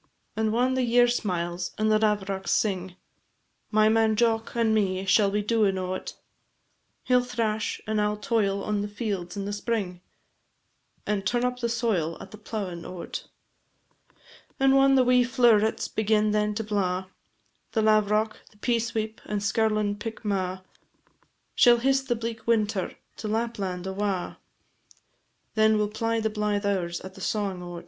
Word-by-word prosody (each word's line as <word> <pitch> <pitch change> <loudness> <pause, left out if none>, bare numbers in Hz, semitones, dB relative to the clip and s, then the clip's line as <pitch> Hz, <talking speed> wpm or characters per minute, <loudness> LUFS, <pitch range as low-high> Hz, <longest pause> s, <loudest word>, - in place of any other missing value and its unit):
And 220 0 0
whan 250 +3 +2
the 260 - +1
year 245 0 +4
smiles, 175 -6 -2
and 215 0 +2
the 215 - +4
lavrocks 200 -3 0
sing, 190 -3 0 0.7
My 215 0 +4
man 220 0 +3
Jock 225 0 +1
and 230 -2 +2
me 190 -3 0
shall 200 +1 +4
be 205 +1 -1
doin' 210 -3 +2
o't; 185 0 -4 0.9
He 250 - +2
'll 250 - +5
thrash, 225 -3 -2
and 215 -1 0
I 210 - +2
'll 210 0 -2
toil 205 -2 0
on 210 -1 -1
the 205 - -2
fields 205 -4 -4
in 200 - -3
the 205 - -3
spring, 205 -4 -3 1.0
And 210 -2 -1
turn 240 +5 +1
up 250 0 -2
the 235 -1 -1
soil 215 -9 0
at - - -11
the 215 - -11
plowin' 195 -6 -5
o't. 180 -2 -7 1.3
And 270 0 +4
whan 270 0 +5
the 260 - +5
wee 250 0 +4
flow'rets 235 -4 +3
begin 215 0 +1
then 210 0 +1
to 220 - -2
blaw, 190 -3 -1 0.7
The 220 - +1
lavrock, 215 0 +2
the 210 - -24
peasweep, 225 -1 -1
and 210 -1 -2
skirlin' 215 0 0
pickmaw, 195 -5 -3 0.9
Shall 240 -1 +6
hiss 270 +3 +2
the 265 -2 -1
bleak 230 0 -6
winter 215 -4 +1 0.2
to 220 - -5
Lapland 210 -5 -2
awa, 190 -1 -2 1.1
Then 220 0 +4
we 210 - +2
'll 205 - -2
ply 225 +1 -1
the 220 0 -1
blythe 210 -1 -1
hours 180 -4 -1
at 190 0 -9
the - - -12
sawin' 200 -4 -2
o't. 175 -1 -7
215 Hz, 160 wpm, -26 LUFS, 195-230 Hz, 1.3 s, Shall